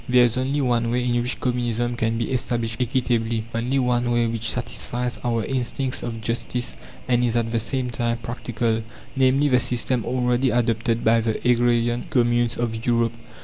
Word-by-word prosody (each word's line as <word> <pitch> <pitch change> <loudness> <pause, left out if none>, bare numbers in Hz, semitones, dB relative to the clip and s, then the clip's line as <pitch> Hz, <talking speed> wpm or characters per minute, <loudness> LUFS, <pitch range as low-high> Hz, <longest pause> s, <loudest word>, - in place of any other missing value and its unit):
There 125 0 +6
is 120 0 +1
only 135 +3 0
one 120 -3 +1
way 125 +1 0
in 120 0 +1
which 125 +1 -1
Communism 120 -1 -1
can 115 -1 0
be 115 +2 -2
established 120 -2 -1
equitably, 115 -2 0
only 120 +4 0
one 125 -2 +1
way 120 0 +2
which 115 -1 -1
satisfies 125 -1 -2
our 115 -3 0
instincts 130 0 -2
of 115 -2 -5
justice 120 +2 -3 0.3
and 125 -1 +2
is 120 -1 +1
at 115 -1 -1
the 115 - +1
same 125 +2 -1
time 120 0 -1
practical; 115 -1 -2 0.3
namely, 135 +2 +3
the 125 -3 +4
system 125 -1 +1
already 125 +2 +1
adopted 115 -1 0
by 115 +1 +4
the 110 -1 -1
agrarian 120 0 +2
communes 120 -1 +2
of 115 -1 -2
Europe. 115 -1 +1
120 Hz, 175 wpm, -23 LUFS, 115-125 Hz, 0.3 s, There